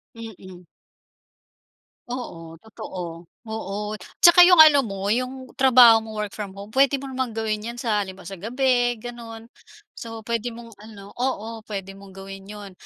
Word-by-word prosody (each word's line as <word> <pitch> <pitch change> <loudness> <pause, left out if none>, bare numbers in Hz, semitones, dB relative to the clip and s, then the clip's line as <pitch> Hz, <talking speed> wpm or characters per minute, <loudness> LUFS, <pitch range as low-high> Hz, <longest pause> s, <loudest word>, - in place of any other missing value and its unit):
Mm. 190 -5 -11 1.4
Oo 170 -10 -7
totoo. 175 -6 -8 0.2
Oo, 210 0 -5 0.3
tsaka 350 +1 +9
'yong 355 -2 +8
ano 305 -2 +7
mo, 195 -1 -4
'yong 255 +2 -3
trabaho 245 -3 +7
mo 220 -1 -10
work 210 -1 -4
from 205 -3 -7
home 200 +2 -10
puwede 275 +3 +3
mo 275 - -7
namang 260 -3 -3
gawin 215 -1 -2
'yan 235 +1 -6
sa 215 -3 0
halimbawa 190 -1 -6
sa 195 - -8
gabi 245 +3 +1
gano'n. 230 -1 -9 0.5
So 225 -1 -8
puwede 235 +1 -3
mong 230 0 -12
ano 205 -2 -13
oo, 230 -3 -3
puwede 195 -2 -6
mong 195 -1 -14
gawin 195 0 -10
'yon. 205 -1 -10
220 Hz, 155 wpm, -23 LUFS, 200-245 Hz, 1.4 s, tsaka